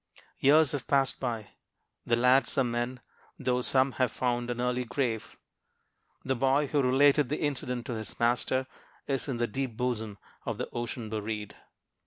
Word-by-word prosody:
Years 150 +2 +5
have 140 -6 -4
passed 135 -1 +2
by. 115 -5 -3 0.6
The 120 - +4
lads 125 +4 +3
are 135 - +5
men, 120 +1 -2 0.4
though 125 -2 0
some 130 +2 +3
have 125 -3 +3
found 120 0 -1
an 120 0 -3
early 125 0 0
grave. 120 -2 -2 0.9
The 130 - +1
boy 135 +3 +3
who 145 +1 +1
related 140 +2 +4
the 150 - -2
incident 125 -5 -2
to 125 - -3
his 110 -3 -6
master 120 +2 +1 0.4
is 135 0 -1
"in 130 -4 -2
the 120 - +1
deep 120 0 -4
bosom 110 -4 -2 0.3
of - - -3
the - - -3
ocean 120 -1 -4
buried." 105 -1 -4
125 Hz, 165 wpm, -29 LUFS, 120-135 Hz, 0.9 s, Years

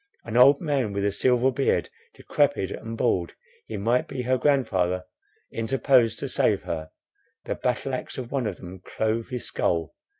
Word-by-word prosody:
An 115 - -5
old 135 +3 +7
man, 140 - -1
with 100 0 -1
a 100 - +2
silver 125 +4 +2
beard, 135 +1 +1 0.3
decrepid - - 0
and 115 0 -6
bald, 90 -9 0 0.3
he 110 - -5
might 115 +5 +1
be 130 -2 -4
her 130 +1 +2
grandfather, 95 -11 +1 0.5
interposed 120 0 +2
to - - -4
save - - +1
her; 80 -1 -4 0.6
the - - -1
battle 125 +2 -2
axe 130 - -5
of 125 -2 -6
one 130 -5 0
of - - -4
them 90 0 -10
clove 110 +1 -2
his 125 -2 -4
skull. 80 -4 -1
115 Hz, 170 wpm, -25 LUFS, 100-130 Hz, 0.6 s, old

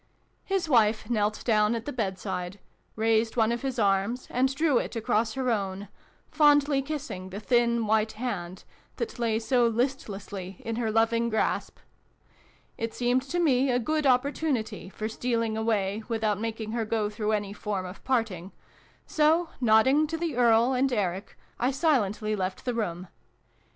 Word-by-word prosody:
His 385 -3 -1
wife 225 -4 +2
knelt 210 -2 0
down 215 -1 +3
at 230 0 -5
the 290 - -4
bedside, 190 -4 -3 0.4
raised 225 +1 +1
one 225 0 +3
of 235 - -2
his 270 -2 -3
arms, 200 +4 +1
and 260 +2 +2
drew 300 -4 +3
it - - -5
across 225 -1 0
her 260 -2 0
own, 195 -2 -3 0.4
fondly 290 -2 +4
kissing 265 -10 -5
the. 195 +2 -6
thin 235 0 +2
white 220 +1 +1
hand 190 -7 -5 0.3
that 455 - -5
lay 230 -2 +1
so 240 +1 +2
listlessly 205 -6 -3
in 230 0 -3
her 235 -2 -1
loving 230 +1 +2
grasp. 220 -1 -1 1.0
It 225 0 -3
seemed 245 +1 +1
to 350 - -1
me 270 -5 +3
a 245 - +2
good 305 +4 0
opportunity 255 -5 0
for 215 +2 -4
stealing 230 -1 -1
away 215 -2 0
without 220 -3 0
making 225 -1 -4
her 230 0 -1
go 215 -1 -1
through 210 0 -2
any 205 -1 -2
form 205 -2 -3
of 180 +1 -10
parting: 215 -8 -1 0.5
so, 320 +2 +2
nodding 255 +7 +4
to 325 +2 -3
the 325 -4 -2
Earl 235 +1 +4
and 260 +1 +1
Eric, 195 -4 -2 0.2
I 250 - +2
silently 225 - +1
left 185 -1 -4
the 250 - 0
room. 185 -6 -3
225 Hz, 160 wpm, -27 LUFS, 210-255 Hz, 1.0 s, fondly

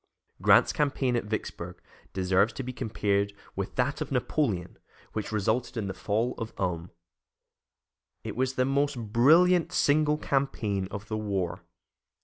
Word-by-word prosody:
Grant's - - +5
campaign 140 -4 +1
against 115 -3 -2
Vicksburg 110 - -4 0.3
deserves 95 +3 +2
to 135 - -5
be 125 +1 -5
compared 100 -4 0 0.2
with - - -4
that - - 0
of - - -3
Napoleon 105 - -1 0.3
which 110 0 -3
resulted 110 +4 0
in 110 - -1
the 95 - -3
fall 110 +6 -1
of 115 -1 -5
Ulm. 90 -2 -2 1.3
It - - -5
was 130 +2 0
the 130 - +2
most 140 0 +1
brilliant 160 - +4
single 150 -3 +3
campaign 110 -10 -1
of 100 +1 -7
the 110 - -2
war. 95 -4 -2
115 Hz, 140 wpm, -28 LUFS, 100-135 Hz, 1.3 s, Grant's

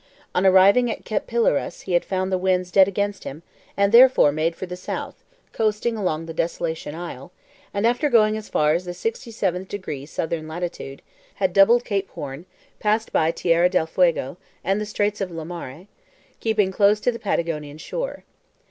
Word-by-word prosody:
On 185 +2 +3
arriving 200 +6 +6
at - - -5
Cape 215 -2 -2
Pilares 235 0 0
he 185 - -5
had 175 - +3
found 185 0 -2
the 185 - +1
winds 180 -1 0
dead 190 0 +6
against 200 0 -2
him, 150 +5 -8 0.3
and 200 0 +3
therefore 245 - +7
made 160 +3 -1
for 185 - -6
the 180 0 -6
south, 180 - -6 0.3
coasting 220 +1 0
along 165 -6 -2
the 165 - -7
Desolation 160 -2 -3
Isle, 170 -3 -8 0.4
and 200 +2 -1
after 245 +6 +2
going 215 -4 +4
as 215 -1 -7
far 150 0 +2
as 175 +3 -1
the 175 0 -6
sixty 225 +6 -4
seventh 190 -4 -2
degree 150 -9 -6
southern 160 0 -3
latitude, 160 -4 -6 0.3
had 190 -2 0
doubled 235 +5 +5
Cape 195 -2 -2
Horn, 145 +5 -8 0.3
passed 215 +1 0
by 160 - +3
Terra 170 +1 +2
del 180 -3 +1
Fuego 165 -3 +1 0.3
and 195 +2 0
the 210 - -4
Straits 210 0 -1
of 190 - -2
Lemaire, 165 -2 -7 0.5
keeping 215 -4 +1
close 205 +2 +3
to 245 - +2
the 230 - -8
Patagonian 155 -6 -2
shore. - - -5
185 Hz, 180 wpm, -23 LUFS, 165-210 Hz, 0.5 s, therefore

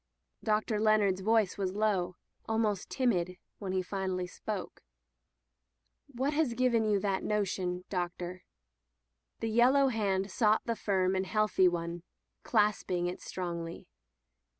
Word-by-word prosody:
Dr. 215 0 +1
Leonard's 210 -3 +3
voice 215 -1 +2
was 190 -2 -1
lowj 200 -4 0 0.3
almost 220 -3 0
timid, 185 -9 0 0.2
when 195 -3 -4
he 185 0 0
finally 185 -1 -2
spoke: 190 +1 -6 1.3
What 275 +2 -1
has 295 -6 +1
given 235 -3 +2
you 205 -1 +3
that 195 -1 0
notion, 185 -3 -1
Doctor?" 180 0 -4 1.0
The 225 - -1
yellow 260 +4 +5
hand 195 -4 0
sought 215 -2 +3
the 230 - -1
firm 190 -3 +1
and 190 0 -1
healthy 215 -3 +3
one, 170 0 -2 0.4
clasping 205 -5 +1
it 180 +1 -3
strongly. 170 -2 -5
200 Hz, 125 wpm, -31 LUFS, 185-220 Hz, 1.3 s, yellow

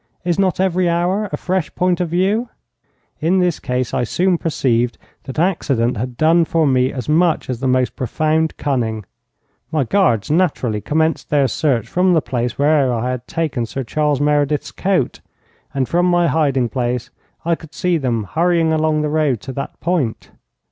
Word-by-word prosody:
Is 175 +1 0
not 185 -3 +1
every 185 -1 +2
hour 180 +5 0
a - - -2
fresh 185 -3 -1
point 180 0 +1
of 175 - -1
view? 200 +8 +1 0.7
In 170 +5 +2
this 180 -3 +1
case 125 -1 -2
I 125 - +1
soon 175 +8 +1
perceived 125 -6 0 0.3
that 135 - -7
accident 140 -9 +1
had 125 +2 -4
done 165 +3 +4
for 165 0 +1
me 130 -1 +2
as 130 -3 -6
much 160 -2 +2
as 120 - -4
the 130 - -1
most 130 0 +1
profound 155 +4 0
cunning. 115 -7 -2 0.7
My 155 -3 +1
guards 125 - +1
naturally 145 - +1
commenced 160 +4 0
their 145 -2 +3
search 130 -1 0
from 180 0 +2
the 165 - +4
place 120 -3 -3
where 145 -2 +3
I 120 +1 -1
had 125 -1 -5
taken 150 -8 -2
Sir 135 +4 -4
Charles 150 +2 0
Meredith's 145 0 +1
coat, 185 -9 -1 0.5
and 135 -2 -1
from 175 +1 +2
my 175 -1 +3
hiding 135 -7 +1
place 125 0 -2 0.3
I 170 - +2
could 160 -2 -7
see 180 +1 +1
them 120 -5 -1
hurrying 165 - +1
along 155 -1 +1
the - - 0
road 150 -6 +1
to 135 - -7
that 140 +2 -6
point. 160 -10 -1
150 Hz, 175 wpm, -19 LUFS, 125-170 Hz, 0.7 s, done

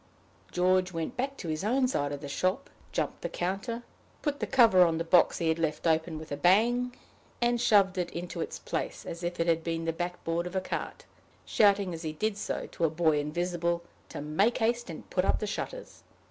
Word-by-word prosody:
George 185 +1 +2
went 165 -2 -4
back 270 +2 -2
to - - -6
his 155 +2 -2
own 255 +5 +2
side 145 - -1
of 145 -1 -5
the 145 - -6
shop, 185 +7 -1 0.2
jumped - - -2
the - - -3
counter, 200 +7 -3 0.4
put 290 -1 -1
the - - -2
cover 225 -8 +6
on 165 -2 +2
the 165 - -1
box 170 +1 +4
he 165 - -1
had 160 +1 +1
left 155 -1 -1
open 160 0 +1
with 155 0 -9
a - - 0
bang, 240 +9 +3 0.4
and 240 0 +2
shoved 200 -5 +4
it 175 -1 -1
into 175 +1 -5
its - - -4
place - - -4
as 170 +1 -6
if 175 0 -3
it 165 - +2
had 165 -1 +2
been 165 0 -2
the 165 - 0
backboard 175 0 -2
of 180 - -8
a - - +3
cart, 185 - -5 0.4
shouting 200 -3 +3
as 165 - -6
he 155 -2 -4
did 215 +6 -1
so 205 - -3
to - - -4
a 165 - +4
boy 160 -1 +2
invisible, 170 +2 -1 0.3
to - - -6
make 160 +11 +2
haste 235 -1 0
and 160 - -8
put 180 - +1
up - - +2
the - - -3
shutters. - - -6
175 Hz, 215 wpm, -29 LUFS, 165-210 Hz, 0.4 s, cover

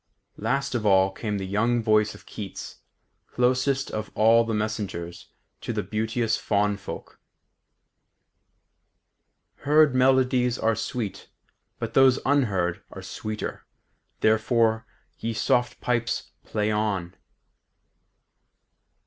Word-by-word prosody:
Last 135 +6 -1
of 120 -3 -1
all 95 -2 +4
came 105 +1 -3
the 95 - -4
young 115 +5 +1
voice 110 0 +2
of - - -16
Keats, 100 -3 -8 0.5
closest 130 +2 +1
of 110 0 -4
all 115 +2 +5
the 115 - -3
messengers 100 -6 -4 0.3
to - - -4
the - - -2
beauteous 110 +1 -1
faun 105 0 +1
folk. 100 - -9 2.4
"Heard 150 -1 +4
melodies 130 -1 +3
are 115 0 +2
sweet, 110 -2 -4 0.5
but 115 -1 -5
those 135 -1 +6
unheard 100 -11 +1
Are - - -10
sweeter: 110 0 -6 0.5
therefore, 110 0 +2 0.3
ye 115 0 -2
soft 120 +2 +1
pipes, 115 -1 -1
play 105 0 -1
on.... 100 -5 -1
110 Hz, 105 wpm, -25 LUFS, 105-125 Hz, 2.4 s, those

